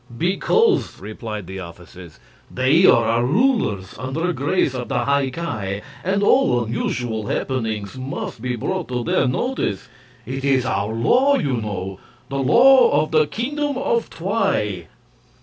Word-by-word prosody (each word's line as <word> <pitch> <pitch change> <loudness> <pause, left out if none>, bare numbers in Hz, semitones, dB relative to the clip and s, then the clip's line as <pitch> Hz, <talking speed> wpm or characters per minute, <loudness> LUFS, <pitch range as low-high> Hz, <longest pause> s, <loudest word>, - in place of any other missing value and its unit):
"Because," 360 - +1
replied 105 0 -7
the 95 +2 -7
officers, 90 -1 -12 0.3
"they 135 +8 +3
are 115 - +5
our 115 +1 +1
rulers, 135 - +1
under 155 +8 -2
grace 145 +1 0
of 125 -2 -4
the 120 -1 -1
High 140 -1 +1
Ki, 110 -10 -4 0.2
and 195 +3 0
all 125 - +3
unusual 115 -1 -3
happenings 110 -6 -3
must 130 -2 -6
be 125 0 -2
brought 185 +9 -3
to 125 -1 -3
their 115 - +1
notice. 130 - -2 0.4
It 135 +3 -5
is 135 -3 +2
our 100 -3 -1
law, 250 - +3
you 145 - -1
know 95 -3 -5 0.3
the 140 0 -3
law 240 - +5
of 155 - -7
the 155 -1 +3
Kingdom 285 - -2
of 235 -3 -1
Twi." 165 - -1
130 Hz, 145 wpm, -21 LUFS, 110-185 Hz, 0.4 s, are